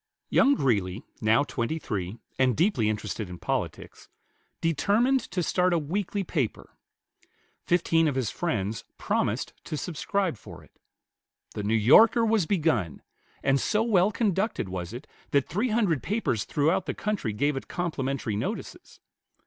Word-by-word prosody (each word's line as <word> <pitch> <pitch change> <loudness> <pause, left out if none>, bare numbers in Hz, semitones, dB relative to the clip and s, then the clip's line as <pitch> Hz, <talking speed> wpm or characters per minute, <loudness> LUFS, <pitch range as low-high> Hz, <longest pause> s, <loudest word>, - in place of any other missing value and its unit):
Young 280 +1 +5
Greeley, 105 - 0 0.2
now 115 +5 +4
twenty 140 +2 -2
three, 100 - -4 0.2
and 130 -3 +3
deeply 155 - +2
interested 105 -1 -3
in 90 - -7
politics, - - -4 0.5
determined 210 - +2
to 180 - -1
start 180 +2 +2
a - - +3
weekly 195 +6 -2
paper. 145 - -3 0.9
Fifteen 165 -2 +3
of 145 - 0
his 130 -5 -1
friends 110 - -2
promised - - -1
to 155 - -4
subscribe 175 - -2
for - - -12
it. - - -21 0.8
The - - -4
"New 105 +2 +1
Yorker" 220 - +6
was 220 -6 +2
begun, 150 - 0 0.4
and 135 0 +2
so 215 +1 +1
well 205 -3 +3
conducted 205 - 0
was 90 -1 -5
it 125 +5 -8 0.2
that 140 -2 +2
three 210 +10 -1
hundred 205 - +1
papers 195 - -1
throughout 165 +6 +1
the - - -2
country 210 - -2
gave 145 +7 0
it 135 - -5
complimentary 135 - -2
notices. 105 - -5
155 Hz, 145 wpm, -27 LUFS, -, 0.9 s, Yorker